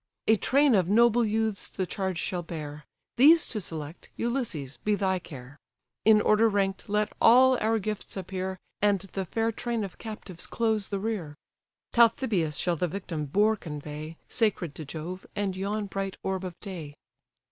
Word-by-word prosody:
A 220 - +5
train 275 +5 +3
of 185 -4 +3
noble 235 +2 +5
youths 220 -1 -1
the 190 - -3
charge 190 -1 -3
shall 180 +1 -2
bear; 150 -3 -7 0.3
These 310 +6 +7
to 220 - -3
select, 160 -2 -7
Ulysses, 225 - -2
be 210 0 0
thy 190 -2 0
care: 140 -4 -11 0.5
In 215 -1 +7
order 215 +2 +4
rank'd 195 -2 0
let 210 0 0
all 260 +3 +7
our 225 +1 +2
gifts 210 -1 -4
appear, 190 0 -4 0.2
And 200 -2 +3
the 195 0 -5
fair 225 +5 0
train 230 0 -2
of 195 -3 -7
captives 210 -6 -7
close 220 -3 0
the 200 - -2
rear: 195 -8 -3 0.6
Talthybius 225 - +3
shall 175 +1 +1
the 180 - 0
victim 165 -4 -4
boar 210 +9 +3
convey, 150 -2 -7
Sacred 205 - 0
to 155 - -7
Jove, 170 +6 -6
and 200 -2 -1
yon 205 +2 -2
bright 195 -1 -4
orb 190 -1 -2
of 180 -1 -7
day." 165 -8 -7
195 Hz, 165 wpm, -28 LUFS, 170-220 Hz, 0.6 s, These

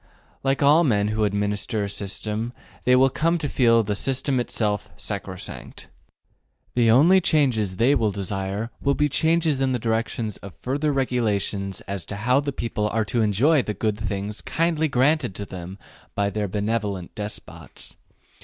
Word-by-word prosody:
Like 135 +1 +1
all 150 +4 +6
men 105 -8 +2
who 110 0 +1
administer 105 +2 -1
a - - -2
system, 105 +4 -3 0.3
they 125 - +5
will 135 +1 +5
come 165 +5 +1
to 155 -3 -2
feel 115 -4 +4
the 105 0 -2
system 135 +3 0
itself 105 -3 -1
sacrosanct. - - -7 0.8
The 120 -2 +3
only 165 +11 +6
changes 125 - +2
they 120 +8 +4
will 115 -6 +2
desire 100 +2 -3
will 140 0 +2
be 150 - +2
changes 160 0 +2
in 130 -1 +2
the - - +1
direction 115 -1 -1
of 100 -2 -10
further 145 +4 -1
regulations 105 -7 -1
as 100 -2 -5
to 100 - -5
how 125 +6 +2
the 145 0 -2
people 115 -4 -2
are 110 0 0
to 115 +2 0
enjoy 125 +9 +3
the 105 -3 -4
good 105 +1 -1
things 105 0 -3
kindly 165 -1 0
granted 140 -4 +2
to 100 - -5
them 95 0 -8 0.4
by 100 0 +1
their 105 -1 -1
benevolent 105 -2 -2
despots. 105 0 -7
115 Hz, 165 wpm, -24 LUFS, 105-135 Hz, 0.8 s, all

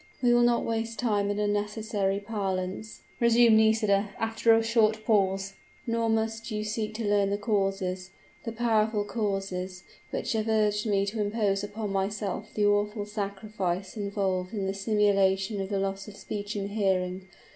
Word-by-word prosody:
"We 240 -1 +5
will 240 - +5
not 240 0 +3
waste 230 0 -2
time 205 -4 +1
in 205 - -1
unnecessary 210 -1 -1
parlance," 195 -1 -4 0.2
resumed 235 -1 +6
Nisida, 215 -2 +3
after 225 +1 +2
a 225 0 +5
short 220 -1 +2
pause; 195 -2 +1 0.3
"nor 230 -1 0
must 225 +1 -1
you 215 -1 -2
seek 215 0 -3
to 225 0 -3
learn 205 -1 +3
the 200 - 0
causes 195 -3 -1 0.3
the 230 - -4
powerful 220 -2 +1
causes, 195 -4 -3 0.3
which - - -2
have 220 0 -1
urged 210 -1 +1
me 200 -1 +2
to 210 +2 -2
impose 205 -1 0
upon 210 0 -4
myself 195 +1 -2
the 210 - +2
awful 205 +1 +1
sacrifice 200 -2 -3
involved 200 -2 -2
in 200 -2 -1
the 190 - -1
simulation 195 -1 +2
of 190 - -4
loss 195 0 -2
of 205 -1 -10
speech 205 0 -5
and 200 0 -3
hearing. 190 -2 0
205 Hz, 155 wpm, -28 LUFS, 195-220 Hz, 0.3 s, resumed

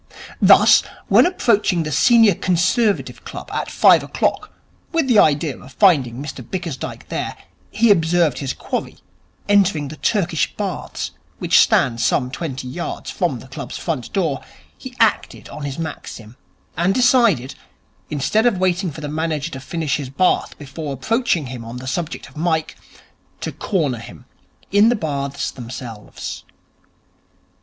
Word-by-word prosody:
Thus, - - +7 0.3
when - - +6
approaching 210 - +1
the 150 - -4
Senior 225 - +5
Conservative 185 +6 0
Club - - -8
at - - -2
five - - +5
o'clock - - -2 0.4
with 330 -3 +1
the 235 -5 +5
idea 150 -2 +3
of 130 - -14
finding 145 - +3
Mr 135 -1 -7
Bickersdyke 165 -3 -6
there, - - -4 0.3
he 225 0 +3
observed 165 -5 +2
his 135 -2 -2
quarry - - -4 0.5
entering 190 -8 +3
the 155 - -9
Turkish 175 -6 0
Baths 200 -3 -4 0.3
which - - +4
stand 115 -2 +3
some 125 -2 +1
twenty 135 -5 -5
yards 155 +7 -5
from - - -1
the - - -13
club's - - -7
front - - -4
door, - - -1 0.3
he 255 -1 -10
acted 225 -2 +1
on 150 - -7
his 140 -1 -5
maxim, 125 -8 -7 0.4
and 175 +4 +1
decided, 235 - +3 0.6
instead 180 - +1
of 225 -6 +1
waiting 185 0 +1
for 155 +1 -9
the 150 - -4
manager 155 +1 -2
to 130 - -6
finish 150 +3 -2
his 140 -4 -6
bath 180 +7 +1
before 145 +1 -6
approaching 220 - 0
him 125 -2 -7
on 115 +2 -8
the 130 - -8
subject 160 +5 -4
of - - -18
Mike, 160 0 -1 0.6
to - - -4
corner 150 - -1
him - - -12 0.5
in 205 +3 +5
the 245 - +2
Baths 140 - -3
themselves. 120 -3 -8
160 Hz, 150 wpm, -20 LUFS, 135-195 Hz, 0.6 s, Thus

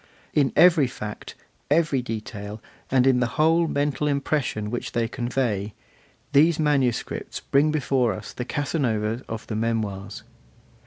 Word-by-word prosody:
In 140 -3 +3
every 165 -6 +6
fact, 105 -4 -7 0.3
every 150 -3 +2
detail, 105 -2 -6 0.3
and 130 -1 +3
in 130 -2 +4
the 125 - +2
whole 165 +2 +4
mental 145 0 0
impression 140 -7 -1
which 120 - -4
they 115 -1 +1
convey, 120 -4 -2 0.6
these 155 +3 +5
manuscripts 140 -6 0
bring 140 +3 +2
before 135 -5 +1
us - - -8
the 125 - -4
Casanova 120 -6 -1
of 115 0 -5
the 110 - -4
Memoirs. 105 -3 -2
125 Hz, 135 wpm, -24 LUFS, 110-145 Hz, 0.6 s, every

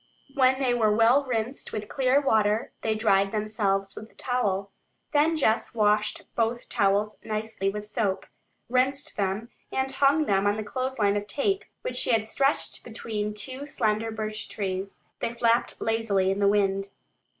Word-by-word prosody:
When 260 -1 +3
they 255 -3 +2
were 220 -3 +3
well 230 +6 +4
rinsed 245 +1 -3
with 210 -1 -4
clear 265 +2 +2
water 220 -5 +1
they 220 -1 0
dried 200 -3 +2
themselves 210 -2 -1
with 220 - -9
the - - -25
towel. 200 -6 -1 0.4
Then 310 +2 +3
Jess 230 -5 +1
washed 210 -1 +2
both 235 +1 0
towels 205 +2 +1
nicely 215 -2 -2
with 210 +1 -5
soap, 210 -3 -1 0.4
rinsed 260 +3 +1
them, 200 +3 -2 0.2
and 265 0 -1
hung 280 +3 +3
them 195 -3 +2
on 205 +1 +1
the 215 - -3
clothesline 220 -3 0
of 205 0 -4
tape, 390 - 0 0.2
which 250 - -3
she - - +2
had 220 -1 +1
stretched 275 +5 0
between 215 -2 -4
two 260 +7 -4
slender 220 -4 0
birch 215 -1 -4
trees. 195 -1 -4 0.2
They 230 - -2
flapped 235 0 +1
lazily 210 -4 +1
in 195 - -2
the 200 - +3
wind. 195 -1 +1
220 Hz, 160 wpm, -26 LUFS, 205-250 Hz, 0.4 s, well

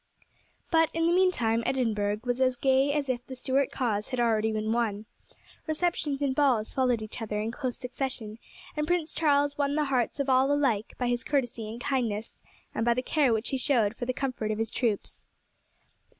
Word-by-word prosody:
But 325 -1 +4
in 330 0 +1
the 340 - +3
meantime 250 -12 +3
Edinburgh 215 -5 0
was 245 +1 -1
as 255 -1 +3
gay 265 +2 +3
as 285 -1 -1
if 245 -2 -2
the 260 - -7
Stuart 260 +1 +1
cause 215 -5 -1
had 255 - -3
been 240 - +3
already 220 -1 +2
won. 215 -1 -1 0.6
Receptions 310 -3 0
and 270 -2 +1
balls 260 -6 +2
followed 250 -4 +1
each 215 +3 -7
other 210 -1 -2
in 220 +2 -2
close 255 0 -3
succession, 245 -4 -4 0.4
and 300 0 -1
Prince 340 -2 0
Charles 290 -2 +2
won 285 0 +1
the 305 -1 +2
hearts 260 -1 0
of 280 - 0
all 265 +1 +4
alike 260 -8 +1
by 250 - -1
his 245 +1 0
courtesy 245 -6 -1
and 230 +2 -7
kindness, 230 -5 -2 0.3
and 225 - -1
by 235 0 +3
the 255 - -1
care 285 -2 +2
which 220 +1 0
he 270 - 0
showed 235 -5 +2
for 245 - -5
the - - +2
comfort 255 -4 -3
of 215 - -1
his 225 0 -1
troops. 225 -5 -2
255 Hz, 195 wpm, -28 LUFS, 225-280 Hz, 0.6 s, But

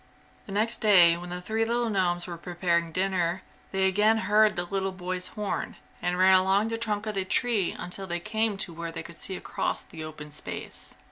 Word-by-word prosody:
The - - -8
next 220 +4 +1
day 180 -6 +7
when 175 +1 -8
the 180 0 -5
three 220 +3 0
little 235 +1 0
gnomes 175 -3 +1
were 175 - -6
preparing 170 -1 -1
dinner 185 0 0 0.3
they 190 0 +2
again 210 +4 +3
heard 210 0 +4
the 175 0 -1
little 195 +1 -2
boy's 180 0 -2
horn, 210 0 -4 0.3
and 180 0 0
ran 185 +1 +6
along 190 +3 +4
the 225 - -2
trunk 215 -2 -1
of 215 - -2
the 195 -1 0
tree 210 -1 +1
until 190 +2 -2
they 175 -1 -2
came 220 +2 0
to 180 -3 -3
where 170 0 -5
they - - -5
could 170 -1 -11
see 190 - -2
across - - -3
the 160 - -9
open 150 -1 -9
space. 150 - -6
190 Hz, 205 wpm, -27 LUFS, 175-210 Hz, 0.3 s, day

